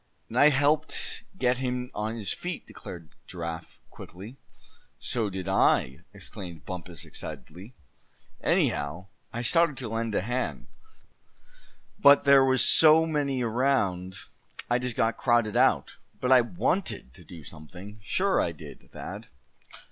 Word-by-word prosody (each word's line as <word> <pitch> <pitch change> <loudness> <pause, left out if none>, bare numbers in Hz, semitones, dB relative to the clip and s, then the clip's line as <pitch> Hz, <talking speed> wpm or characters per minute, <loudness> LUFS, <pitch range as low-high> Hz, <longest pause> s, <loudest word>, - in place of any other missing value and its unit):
"And 120 - -1
I 145 - +8
helped 150 +3 0
get 125 -3 +1
him 125 -1 -3
on 110 +2 -3
his 105 -4 -2
feet!" 175 -2 -6
declared 85 -3 -11 0.2
Giraffe, 85 -2 -7
quickly. 100 +9 -11 0.6
"So 115 -4 -2
did 95 -2 -6
I!" 65 +2 +2
exclaimed 85 -5 -10
Bumpus, 90 -3 -7
excitedly; 95 +10 -8 0.7
"anyhow, 85 +7 0 0.2
I 120 +1 -4
started 165 +1 +3
to 130 - -4
lend 115 -1 -2
a - - +2
hand; 125 +6 -3 1.3
but 140 -7 +7
there 140 -1 +6
was 130 -1 +4
so 160 0 +6
many 140 -5 -1
around 110 -7 0 0.6
I 120 - +3
just 125 -2 -3
got 115 0 +1
crowded 120 -3 +2
out. - - +2 0.2
But 125 - -1
I 130 -1 +8
wanted 175 - -2
to - - -12
do 80 -3 -12
something, 90 +8 -11
sure 190 - +1
I 85 - -1
did, 75 - -13
Thad!" - - -8
115 Hz, 135 wpm, -27 LUFS, 95-135 Hz, 1.3 s, I